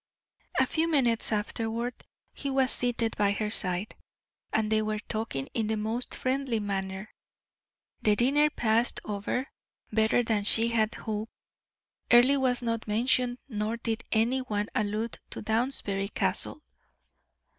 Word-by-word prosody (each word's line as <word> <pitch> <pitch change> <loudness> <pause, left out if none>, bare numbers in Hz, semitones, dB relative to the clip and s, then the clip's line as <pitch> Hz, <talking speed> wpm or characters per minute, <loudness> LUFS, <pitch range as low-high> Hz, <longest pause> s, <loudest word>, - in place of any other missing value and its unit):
A - - +5
few 325 +1 0
minutes 245 -9 +2
afterward 225 +3 -2 0.4
he 280 - -4
was 265 -1 +2
seated 235 -2 +1
by 205 -1 +2
her 210 +1 -2
side, 185 -1 +1 0.6
and 220 -1 0
they 215 0 +3
were 215 0 -1
talking 210 -10 -3
in 225 -2 -1
the 220 0 -1
most 220 +4 -3
friendly 260 -3 -1
manner. 195 0 -4 0.9
The 210 -1 +4
dinner 285 +6 +3
passed 230 -4 +1
over 210 +5 -2 0.5
better 220 +2 +3
than 220 -3 0
she 225 +2 +5
had 220 -1 +1
hoped. 215 0 -4 0.8
Earle 255 +3 +6
was 250 -2 +1
not 230 -1 -2
mentioned 245 +3 +2
nor 215 -1 -2
did 230 -1 -3
any 235 +4 +2
one 210 -5 -2
allude 215 +2 -2
to - - -6
Downsbury 220 -3 0
Castle. 305 - 0
225 Hz, 135 wpm, -28 LUFS, 210-245 Hz, 0.9 s, Earle